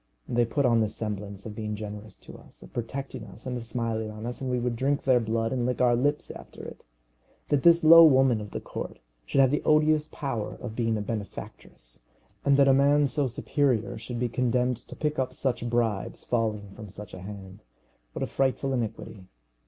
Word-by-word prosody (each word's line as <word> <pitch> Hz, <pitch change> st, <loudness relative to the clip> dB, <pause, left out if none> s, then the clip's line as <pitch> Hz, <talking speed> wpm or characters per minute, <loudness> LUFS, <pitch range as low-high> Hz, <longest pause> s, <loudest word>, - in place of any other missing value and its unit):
They 120 Hz, 0 st, +2 dB
put 135 Hz, +4 st, 0 dB
on 120 Hz, -2 st, +4 dB
the 110 Hz, -1 st, +1 dB
semblance 100 Hz, -2 st, -5 dB
of 110 Hz, -, -6 dB
being 105 Hz, 0 st, -4 dB
generous 105 Hz, 0 st, -8 dB
to -, -, -12 dB
us, -, -, -16 dB
of -, -, -15 dB
protecting 130 Hz, +1 st, -5 dB
us, 110 Hz, +1 st, -13 dB
and 130 Hz, -1 st, -3 dB
of 120 Hz, -, -4 dB
smiling 115 Hz, -2 st, -2 dB
on 110 Hz, +1 st, -8 dB
us, 120 Hz, +2 st, -5 dB
and 130 Hz, -, -2 dB
we 125 Hz, -, 0 dB
would 120 Hz, -1 st, -1 dB
drink 140 Hz, +4 st, 0 dB
their 130 Hz, -2 st, +4 dB
blood 115 Hz, +1 st, -1 dB
and 125 Hz, -2 st, -1 dB
lick 125 Hz, +1 st, -1 dB
our 125 Hz, -1 st, +4 dB
lips 145 Hz, +4 st, 0 dB
after -, -, -11 dB
it! -, -, -10 dB, 0.7 s
That 145 Hz, -2 st, +2 dB
this 170 Hz, +2 st, +6 dB
low 165 Hz, +1 st, +10 dB
woman 130 Hz, -6 st, +4 dB
of 105 Hz, -, -7 dB
the -, -, -5 dB
court -, -, -6 dB, 0.3 s
should 135 Hz, -, +3 dB
have 130 Hz, -1 st, +4 dB
the 150 Hz, -, +1 dB
odious 155 Hz, 0 st, +3 dB
power 135 Hz, -9 st, -4 dB
of 115 Hz, -3 st, -7 dB
being 115 Hz, -2 st, 0 dB
a -, -, -2 dB
benefactress, 100 Hz, -, -7 dB, 0.4 s
and 140 Hz, 0 st, +4 dB
that 140 Hz, -1 st, +5 dB
a 135 Hz, -, +6 dB
man 145 Hz, +2 st, +4 dB
so 140 Hz, 0 st, 0 dB
superior 120 Hz, -2 st, 0 dB
should 120 Hz, +1 st, -6 dB
be 125 Hz, -, +1 dB
condemned 125 Hz, 0 st, 0 dB
to 120 Hz, -, -12 dB
pick 150 Hz, -2 st, -2 dB
up 130 Hz, 0 st, -2 dB
such 120 Hz, -3 st, -1 dB
bribes 115 Hz, -4 st, -1 dB
falling 110 Hz, -4 st, -1 dB
from 105 Hz, +1 st, -10 dB
such 105 Hz, +1 st, -10 dB
a 90 Hz, -, -8 dB
hand, 95 Hz, -1 st, -9 dB, 0.5 s
what -, -, -3 dB
a -, -, +1 dB
frightful 135 Hz, 0 st, 0 dB
iniquity! 110 Hz, -5 st, -4 dB
120 Hz, 210 wpm, -27 LUFS, 110-135 Hz, 0.7 s, low